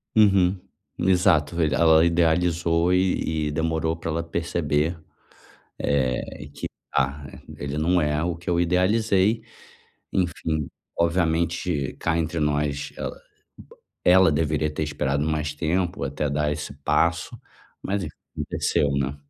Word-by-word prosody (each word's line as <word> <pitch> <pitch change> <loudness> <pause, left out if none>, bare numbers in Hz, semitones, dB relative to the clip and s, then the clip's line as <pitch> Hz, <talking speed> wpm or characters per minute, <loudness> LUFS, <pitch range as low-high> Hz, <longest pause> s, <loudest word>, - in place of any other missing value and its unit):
Uhum, 100 -3 +4 0.4
exato, 90 -5 +3
velho, 75 -5 +1
ela 80 +1 +5
idealizou 85 0 +2
e 80 -4 +1
e - - -3
demorou 80 0 0
pra 80 0 -6
ela 85 +1 -1
perceber, 85 -1 -1 0.8
eh, 70 +1 -1
que: - - -5 0.3
"Ah, 70 +2 0 0.3
ele 70 +1 -4
não 90 +3 +2
é 75 +1 0
o 85 0 -1
que 85 +2 -10
eu 85 0 +2
idealizei", 100 +4 +2 0.7
enfim, 80 -5 -1 0.3
obviamente, 85 -3 0
cá 85 0 0
entre 80 0 -1
nós, 75 -1 -1
ela - - -5 0.4
uba - - -16 0.3
ela 95 -2 +6
deveria 75 0 0
ter 80 - -3
esperado 70 -1 -1
mais 75 -1 -1
tempo 85 -1 -1
até 70 +2 -2
dar 75 +1 0
esse 75 0 -4
passo, 85 0 +1 0.4
mas 100 0 -1
enf - - -6 0.2
aconteceu, 70 - 0
né. 70 0 -1
80 Hz, 130 wpm, -24 LUFS, 75-90 Hz, 0.8 s, ela